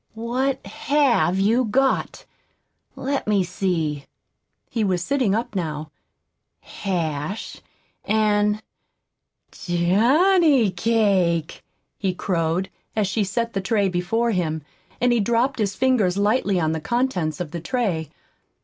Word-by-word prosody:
"What 250 +4 -2
HAVE 240 -4 +1
you 225 +6 +3
got? 260 +4 0 0.7
Let 275 -2 -2
me 205 -3 +3
see." 170 -6 -2 0.6
He 225 - -2
was 185 -3 0
sitting 250 -4 +1
up 225 -1 -3
now. 155 -4 -3 0.7
"Hash 170 0 -4 0.4
and 210 0 +1 0.9
johnny 240 - +3
cake!" 185 -5 +1 0.4
he 190 -3 -1
crowed, 180 +1 -1 0.2
as 215 -2 +2
she 200 +3 0
set 230 +4 -2
the 195 - -1
tray 200 0 +1
before 195 +7 0
him, 160 -6 -1 0.4
and 245 0 +3
he 240 - +2
dropped 235 +5 +1
his 205 -2 0
fingers 230 -8 +2
lightly 205 -2 +2
on 160 -2 +1
the 160 -1 -3
contents 190 -7 -1
of 175 -4 -4
the 170 -1 -5
tray. 175 - -1
200 Hz, 120 wpm, -23 LUFS, 175-235 Hz, 0.9 s, you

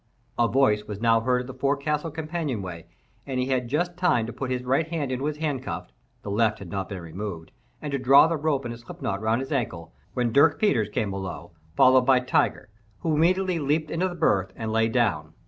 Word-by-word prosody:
A 120 - +4
voice 110 -5 +2
was 105 -1 -6
now 115 0 +4
heard 125 +1 +1
at - - -7
the 130 - -8
forecastle 140 +4 -1
companion 155 - -3
way, 85 -3 -8 0.4
and 130 -2 -2
he 125 - +1
had 125 -2 0
just 175 +7 -1
time 175 -11 +2
to 115 - -6
put 135 - -4
his 125 -1 -2
right 135 +5 +1
hand 155 -5 -3
into 130 +3 -2
its 150 0 -3
handcuff 140 - -4 0.3
(the 100 - -5
left 110 +1 +2
had 95 -5 -10
not 95 -1 -3
been 100 -3 -5
removed) 85 0 -6 0.3
and 150 - -4
to 140 - -1
draw 135 +3 +7
the 165 +1 0
rope 145 -3 -1
in 120 - -3
a 120 - -8
slipknot 115 -4 -5
around 110 +3 0
his 135 - -6
ankle, 90 - -3 0.2
when 120 -3 0
Dirk 145 +2 +5
Peters 120 - +2
came 105 -1 -2
below, 95 -3 -6 0.2
followed 130 +4 +6
by 130 -1 +6
Tiger, 125 -4 0 0.3
who 160 - 0
immediately 180 +3 +2
leaped 150 +2 0
into 180 +3 0
the 175 - -7
berth 95 - +1
and 110 -1 -4
lay 110 0 +2
down. 85 -11 0
125 Hz, 220 wpm, -25 LUFS, 110-150 Hz, 0.4 s, draw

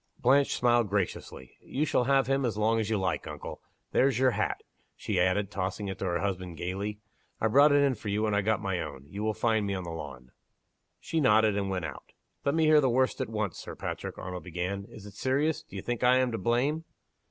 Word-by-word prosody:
Blanche 140 +3 +3
smiled 120 -3 +3
graciously. 95 -9 -3
"You 145 +3 -2
shall 125 - +1
have 135 0 +3
him 135 +1 +1
as 115 -4 -1
long 110 +1 +2
as 110 - -1
you 110 - +1
like, 95 -1 -1
uncle. - - -7 0.3
There's 135 +1 +3
your 130 0 +4
hat," - - -2 0.3
she 100 -4 -2
added, 95 +2 +1
tossing 100 +1 -3
it 95 - -6
to - - -2
her 85 -1 0
husband, 90 -4 -3
gayly. 100 +5 -3 0.4
"I 110 - +2
brought 140 +6 +6
it 145 0 +5
in 140 -2 +3
for 105 -2 -6
you 105 +2 0
when 110 -1 +1
I 100 - +3
got 105 0 0
my 95 -3 -1
own. 70 -4 -6
You 100 +8 -7
will 110 0 0
find 110 -3 +1
me 100 - -1
on 95 - -4
the 85 - -6
lawn." 70 -6 -8 0.7
She 165 - -2
nodded, 110 -4 +4
and 100 -1 -1
went 90 -3 -2
out. 75 -4 -9 0.3
"Let 140 +2 +1
me 160 -1 +3
hear 155 -1 +6
the 135 - +2
worst 130 +2 +1
at 130 - -2
once, 105 -5 -3
Sir - - -8
Patrick," - - -5
Arnold 90 0 -6
began. 90 +3 -3
"Is 105 - -12
it 105 - -10
serious? 140 +8 0
Do - - -15
you 95 - -5
think 120 -1 -3
I 125 +1 +6
am 130 -1 +2
to 115 - -3
blame?" 130 - +1
105 Hz, 235 wpm, -29 LUFS, 95-130 Hz, 0.7 s, brought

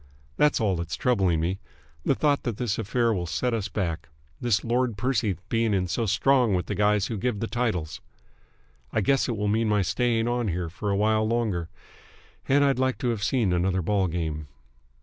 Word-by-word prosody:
That's 150 - +3
all 105 -5 +1
that's 85 0 -3
troubling 95 -10 +1
me, 90 +4 -1 0.4
the 135 - +2
thought 145 0 +2
that 120 -5 -3
this 115 -3 -1
affair 115 +2 +1
will 90 -4 -2
set 125 +8 -1
us 110 -3 -1
back, 85 -8 -3 0.3
this 115 -5 +1
Lord 120 -1 0
Percy 110 -4 0
being 115 -2 +1
in 95 -1 +1
so 110 +6 -1
strong 120 +1 +3
with 90 - -1
the - - -3
guys 105 -1 +2
who 110 0 -3
give 120 -1 -1
the 115 - -1
titles. 100 -9 -2 0.9
I - - +1
guess 135 -1 +2
it 115 - -2
will 105 0 -1
mean 110 +2 +1
my 105 -2 +2
staying 115 +5 +1
on 120 -1 0
here 90 -2 -2
for 100 +5 -4
a 100 - +1
while 110 +1 +2
longer, 110 -8 -1 0.8
and 140 +2 +5
I'd 135 -2 +2
liked 130 +1 0
to 125 - +1
have 110 -4 -2
seen 110 -5 +1
another 90 +1 +1
ball 100 +1 +1
game. 80 -3 -3
105 Hz, 200 wpm, -26 LUFS, 95-120 Hz, 0.9 s, and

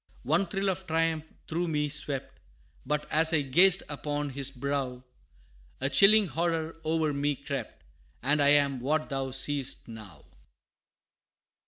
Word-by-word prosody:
One 165 +9 +1
thrill 195 +2 -1
of 190 0 -4
triumph 160 -1 0 0.2
through 170 +2 -2
me 150 -2 0
swept, 145 -2 -3 0.5
But, 150 +1 -1
as 160 +1 +3
I 150 -2 +3
gazed 180 +8 +4
upon 145 0 -3
his 140 0 -1
brow, 135 -1 -3 0.8
A 135 +1 -1
chilling 205 +8 +6
horror 165 -1 -2
o'er 160 -1 0
me 145 +1 0
crept, 140 -4 -6 0.4
And 145 +3 +2
I 140 - +4
am 140 -2 +3
what 155 +5 -1
thou 135 -1 -2
seest 135 +1 0
now! 105 -9 -12
145 Hz, 140 wpm, -28 LUFS, 135-160 Hz, 0.8 s, chilling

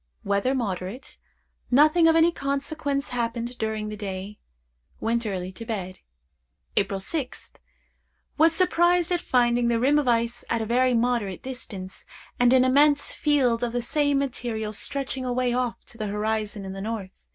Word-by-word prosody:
Weather 200 +7 +1
moderate. 205 +1 -4 0.5
Nothing 310 +6 +5
of 325 - +5
any 330 +1 +5
consequence 280 -1 -2
happened 240 0 -3
during 220 -1 -2
the 210 - -5
day. 200 0 -6 0.6
Went 230 0 0
early 185 -2 -3
to 190 - -8
bed. 195 -5 -5 0.8
"April 195 -1 +1
6th. 260 +6 -4 0.8
Was 320 +2 +5
surprised 350 0 +2
at 350 -1 +1
finding 240 -3 +2
the 235 -1 +2
rim 285 +5 +4
of 290 - -2
ice 235 0 +1
at 230 - +1
a 220 - -2
very 250 +2 +2
moderate 230 -6 0
distance, 210 -8 -8 0.4
and 245 0 +5
an 255 0 +5
immense 285 +2 +3
field 265 -6 +2
of 240 -1 -2
the 245 - 0
same 285 +2 +1
material 235 -5 -2
stretching 265 +3 -3
away 250 -1 0
off 245 -2 -2
to 230 - -12
the 215 - -2
horizon 210 0 -2
in 190 - -6
the 195 - -6
north. 205 -3 -6
240 Hz, 160 wpm, -25 LUFS, 215-275 Hz, 0.8 s, Nothing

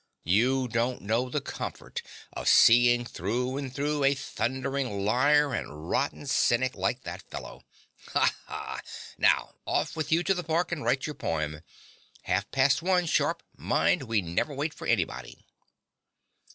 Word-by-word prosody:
You 125 +9 +2
don't 120 +2 -1
know 115 +5 0
the 145 +3 -1
comfort - - -6 0.3
of - - -5
seeing 120 +1 +6
through 120 +6 -2
and 140 -2 -4
through 145 +2 -1
a 135 +1 +4
thundering 130 -5 -2
liar 140 +6 +3
and 75 +1 -5
rotten 145 +1 -1
cynic 130 -1 +2
like 100 +7 -2
that 90 +2 -6
fellow. - - -8 0.5
Ha, - - +3
ha! - - -6 0.4
Now - - +3
off - - 0
with 160 -1 -3
you 165 +2 +3
to 195 - +2
the 180 -1 -3
park, 170 +2 0
and 170 -7 -3
write 125 +3 +1
your 150 - -4
poem. 75 - -3 0.6
Half 95 +3 -1
past 135 +2 +3
one, 180 0 +2
sharp, 160 - +1
mind: 80 +7 +1
we 110 -4 +1
never 90 - -2
wait 150 +3 -2
for - - -8
anybody. - - -2
130 Hz, 150 wpm, -28 LUFS, 105-145 Hz, 0.6 s, seeing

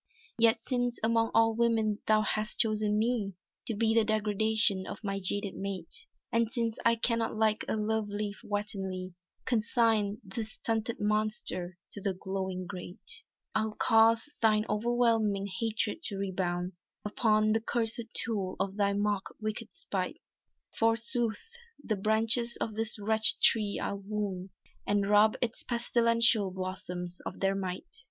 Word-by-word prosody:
"Yet 230 0 +4
since 245 -1 -1
among 225 0 +2
all 225 0 +5
women 225 -2 +1
thou 215 0 +4
hast 215 0 -1
chosen 215 -2 +2
me 215 -4 0 0.3
To 225 - 0
be 225 +1 +2
the 225 -1 +4
degradation 215 -1 +1
of - - -8
my 195 -1 -2
jaded 200 +1 +1
mate, 200 - -6 0.2
And 230 -1 +1
since 230 -3 -2
I 230 0 +4
cannot 230 -1 +1
like 215 -1 +1
a - - 0
love 215 0 -1
leaf 205 0 -4
wantonly 190 -3 -4 0.3
Consign 220 -3 +1
this 220 +2 -5
stunted 225 0 -2
monster 210 -4 0
to 205 - -5
the 195 -1 -1
glowing 190 -1 -4
grate," 200 - -8 0.3
"I'll 220 0 -1
cause 225 +3 +4
thine 215 -1 +3
overwhelming 225 -3 +1
hatred 225 +8 -1
to 200 - 0
rebound 180 -2 -2 0.3
Upon 215 0 +2
the 225 +1 +2
cursèd 230 0 -1
tool 200 -5 0
of 195 +1 -2
thy 200 -1 +2
most 205 -1 0
wicked 215 +1 -4
spite. 330 - -4 0.6
Forsooth, 225 0 +1 0.4
the 215 - -1
branches 220 +4 +2
of 220 - -3
this 225 +1 -1
wretched 220 +1 +4
tree 210 -3 +4
I'll 200 0 -3
wound 200 -2 -3 0.4
And 205 -1 +1
rob 210 +1 +5
its 230 - -3
pestilential 230 -3 +2
blossoms 180 -1 -5
of - - -6
their 195 0 +2
might!" 185 - -4
215 Hz, 145 wpm, -30 LUFS, 200-225 Hz, 0.6 s, all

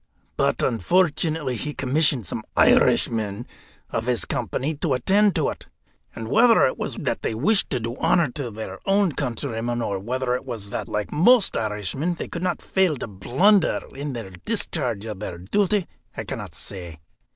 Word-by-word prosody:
But, - - +1
unfortunately, 155 0 +1
he 150 +5 -5
commissioned 140 -3 +1
some - - -4 0.2
Irishmen 110 0 +3 0.5
of 115 +1 -2
his 125 -2 +2
company 130 +5 -2
to 145 -2 0
attend 195 - +3
to - - +1
it. - - -8 0.5
And 115 - -6
whether 230 - +5
it 130 - 0
was - - -4
that - - -2
they 110 - -2
wished 195 - +2
to 130 - -1
do 115 +1 -4
honour 165 -7 +2
to 135 -2 -4
their 105 -3 -7
own 195 -2 +3
countryman, 120 -3 -3
or 100 -4 -2
whether 125 +4 -2
it 125 - -2
was 115 -6 -6
that, - - -3
like 105 -1 -3
most 205 +8 +4
Irishmen, 110 - -1
they - - -5
could 170 - -6
not 185 - -2
fail 185 -6 +1
to - - -4
blunder 140 - +2
in 140 0 -5
the 115 -6 -6
discharge 130 - -2
of 105 -4 -6
their 90 -4 -5
duty, 195 - +1 0.3
I - - -3
cannot - - -6
say. 85 -5 -6
125 Hz, 175 wpm, -24 LUFS, 110-170 Hz, 0.5 s, whether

